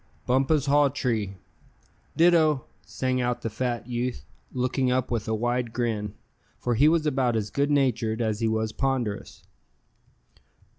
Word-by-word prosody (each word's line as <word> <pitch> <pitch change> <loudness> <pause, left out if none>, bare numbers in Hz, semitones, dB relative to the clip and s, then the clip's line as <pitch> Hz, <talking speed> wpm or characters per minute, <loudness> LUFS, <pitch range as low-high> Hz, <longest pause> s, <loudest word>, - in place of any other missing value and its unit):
"Bumpus 135 +3 +2
Hawtree." 130 -8 +1 0.8
"Ditto," 160 -5 +4 0.2
sang 130 +3 -1
out 120 0 -1
the 115 - -2
fat 120 +1 -2
youth, 120 - -3 0.3
looking 130 +1 0
up 130 0 0
with 115 -3 -1
a 110 - 0
wide 120 +1 -1
grin; 110 -4 -2 0.4
for 120 - -1
he 140 +6 +5
was 160 0 +3
about 130 -5 +1
as 105 -2 -2
good 140 +1 +1
natured 120 -6 +1
as 110 -2 -1
he 115 - +1
was 110 0 0
ponderous. 130 -6 -2
125 Hz, 140 wpm, -26 LUFS, 110-135 Hz, 0.8 s, he